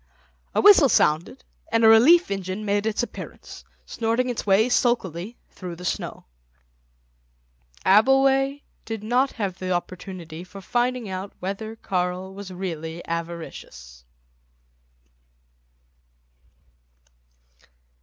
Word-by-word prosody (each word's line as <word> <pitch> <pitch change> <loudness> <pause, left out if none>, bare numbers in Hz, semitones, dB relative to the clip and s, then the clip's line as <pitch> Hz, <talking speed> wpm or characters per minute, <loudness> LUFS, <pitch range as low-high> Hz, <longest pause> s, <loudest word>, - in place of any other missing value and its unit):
A - - +3
whistle 380 -9 +7
sounded, 170 - +1 0.3
and 230 0 +3
a - - +8
relief 255 - +6
engine 195 +2 -4
made 205 +1 0
its 220 +2 0
appearance, - - -9 0.2
snorting 235 +2 -1
its 230 - -5
way 200 +4 +4
sulkily 235 -5 0
through 180 -2 -8
the 180 +2 -10
snow. - - -4 1.6
Abbleway 270 +6 +4 0.2
did 225 -2 -6
not 250 +5 +1
have 195 -5 -4
the 185 - -4
opportunity 175 -2 -5
for 185 +2 -11
finding 245 +3 -1
out 190 +1 -6
whether 200 +4 -5
Karl 185 -2 -3
was 200 0 -8
really 170 -3 -5
avaricious. 165 - -7
200 Hz, 105 wpm, -24 LUFS, 180-240 Hz, 1.6 s, a